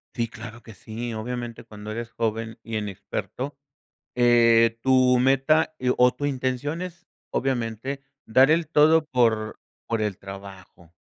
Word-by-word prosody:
Sí, 115 -2 -1
claro 115 +1 -10
que 115 - -12
sí, 115 +5 -6
obviamente, 120 +1 -5
cuando 105 0 -9
eres 115 +1 -5
joven 115 0 -3
y 115 -1 -3
inexperto, 105 +7 -5 0.6
eh, 115 -2 +5
tu 130 0 +4
meta 135 +5 +3
e 125 0 +1
o 125 0 +5
tu 145 - -5
intención 135 +3 -2
es 175 -1 -8 0.2
obviamente 130 +1 -2 0.2
dar 130 +5 +5
el 165 +1 +3
todo 155 +1 +4
por 115 -6 +1 0.3
por 115 -1 -1
el 105 -3 -1
trabajo. 95 -3 -12
120 Hz, 140 wpm, -25 LUFS, 110-135 Hz, 0.6 s, eh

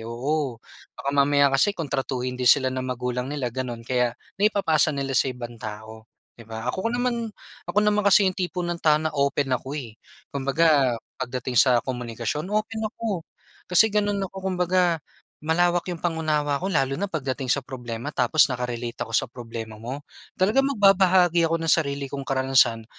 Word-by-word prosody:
Oo, 130 +1 -2 0.4
baka 140 - -2
mamaya 140 0 +4
kasi 135 +9 +4
kung 165 -3 -3
tratuhin 130 -1 -2
din 125 -1 +1
sila 135 -2 +4
ng 130 - -2
magulang 125 0 -3
nila 135 -5 -3
gano'n, 120 -3 -4
kaya 125 -1 0 0.3
naipapasa 165 -8 +3
nila 140 -2 -3
sa 135 - +3
ibang 120 -2 -7
tao, 110 +1 -8 0.3
'di 115 -1 -15
ba? 110 0 -6
Ako 190 +4 -2
naman 240 -1 -1 0.4
ako - - 0
naman 210 0 +2
kasi 200 0 +6
yung 185 - 0
tipo 180 -1 -3
ng 175 -1 -3
tao 155 -1 +4
na 155 0 -2
open 140 -1 0
ako, 135 +3 -2
eh. 120 -7 -7 0.4
Kumbaga, 140 -2 +2 0.2
pagdating 125 0 -4
sa 125 -3 +5
komunikasyon, 125 - -3
open 215 +1 -1
ako. 210 -6 -4 0.5
Kasi, 185 +5 +6
gano'n 205 -1 0
ako, 190 - -17
kumbaga, 180 -2 +1 0.5
malawak 175 +2 +2
yung 170 - -7
pang-unawa 155 -4 0
ko, 190 - -2
lalo 135 -2 +1
na 200 - -1
pagdating 135 -6 -2
sa 140 - +1
problema 120 -1 -6
tapos 135 +5 +3
naka-relate 120 -1 -4
ako 115 - -12
sa - - +2
problema 115 -2 -8
mo. 120 +6 -6 0.4
Talagang 215 +9 +3
magbabahagi 185 -5 +4
ako 165 0 0
ng 165 - -3
sarili 140 -3 +1
kong 140 0 -5
karanasan, 130 -4 +3
140 Hz, 170 wpm, -24 LUFS, 125-175 Hz, 0.5 s, kasi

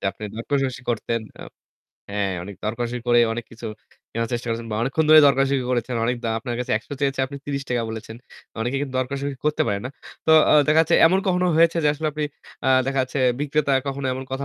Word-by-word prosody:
যে - - -11
আপনি 100 - -16
দরকষাকষি 130 +1 -2
করতেন। 115 0 -1 0.2
আ - - -7 0.7
হ্যাঁ, 100 -2 -1
অনেক 100 0 -9
দরকারী 120 +2 -2
করে 120 0 +4
অনেক 120 0 -4
কিছু 115 0 -9 0.5
কেনার 115 0 -2
চেষ্টা 120 0 -3
করেছেন 115 0 -3
বা 105 - -2
অনেকক্ষণ 135 +6 +1
ধরে 155 - +10
দরকষাকষি 135 -1 +2
করেছেন। 125 0 -1
অনেক 125 +1 0
দা - - 0
আপনার 120 0 -5
কাছে 125 - -4
৳১০০ 130 +5 -7
চেয়েছে 135 -1 +1
আপনি 140 +1 -8
৳৩০ 140 -4 -2
বলেছেন। 110 0 -7 0.4
অনেকে 120 +4 -1
কিন্তু 140 -2 -4
দরকষাকষি 135 +2 -2 0.2
করতে 150 - +2
পারে 100 -2 0
না। 130 - -3 0.4
তো 160 - +4 0.2
আ - - +6 0.2
দেখা 155 +1 +5
যাচ্ছে 160 - +1
এমন 185 +3 +3
কখনো 180 -1 +2
হয়েছে 165 +1 +4
যে 150 - +5
আসলে 155 +1 -4
আপনি 150 0 -2 0.4
আ - - +2 0.2
দেখা 135 0 +1
যাচ্ছে 130 +2 -4 0.2
বিক্রেতা 145 -1 0
কখনো 140 0 -3
এমন 130 +1 -5
কথা 135 +1 -3
130 Hz, 210 wpm, -23 LUFS, 115-140 Hz, 0.7 s, ধরে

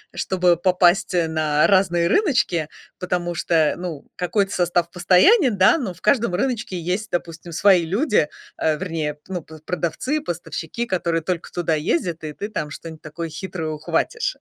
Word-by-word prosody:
чтобы 180 -2 +2
попасть 180 +1 +3
на 155 -3 +2
разные 180 -3 +3
рыночки. 215 - +2 0.3
Потому 175 -1 -2
что, 160 -2 +2
ну, 170 -5 -6
какой-то 195 +3 0
состав 175 -2 +1
постоянен, 210 - +4
да, 190 - +5
но 235 - -3
в 175 - -20
каждом 235 -8 +2
рыночке 230 -3 -2
есть, 185 +6 -3
допустим, 170 -1 -4
свои 180 0 +4
люди, 205 - +1 0.3
э, 155 -1 +1
вернее, 155 -4 -3
ну, 180 -3 -4
п 160 +1 -13
продавцы, 180 - -2
поставщики, 175 - -5
которые 170 -4 0
только 175 +1 -3
туда 170 -2 0
ездят, 165 +2 -1
и 155 -1 -5
ты 205 +7 -6
там 155 -8 -4
что-нибудь 160 0 -9
такое 160 +2 -6
хитрое 160 0 -5
ухватишь. 155 -1 -2
175 Hz, 155 wpm, -22 LUFS, 160-190 Hz, 0.3 s, да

